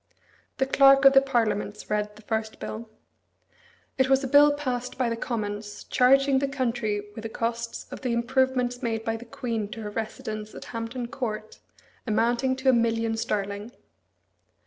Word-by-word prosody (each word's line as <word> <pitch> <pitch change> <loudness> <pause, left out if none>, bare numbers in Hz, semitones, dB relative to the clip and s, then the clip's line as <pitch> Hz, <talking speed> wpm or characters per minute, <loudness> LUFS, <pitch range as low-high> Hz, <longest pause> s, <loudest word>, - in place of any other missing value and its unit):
The 265 - +2
Clerk 275 0 +6
of 275 - +9
the 270 - +7
Parliaments 215 -6 -1
read 210 0 -1
the 215 - -15
first 220 0 -3
bill. 220 +1 -6 1.1
It 260 0 +3
was 270 +1 +4
a - - -1
bill 290 +2 +7
passed 255 -4 -3
by 250 -2 +1
the 230 - -1
Commons, 205 -3 -4
charging 270 +2 +4
the 280 - 0
country 235 -6 -1
with 220 - -7
the 225 - -5
costs 230 +1 -3
of - - -7
the 255 - -1
improvements 245 +1 +1
made 225 -1 -2
by 225 - 0
the 230 +2 -8
Queen 230 -2 -3
to 225 - -7
her 210 - -5
residence 215 -1 -5
at - - -8
Hampton 235 +2 -4
Court, 220 -4 -5 0.5
amounting 240 +4 +1
to 260 0 +1
a - - +6
million 230 -1 +1
sterling. 205 +1 -3
235 Hz, 170 wpm, -26 LUFS, 220-260 Hz, 1.1 s, of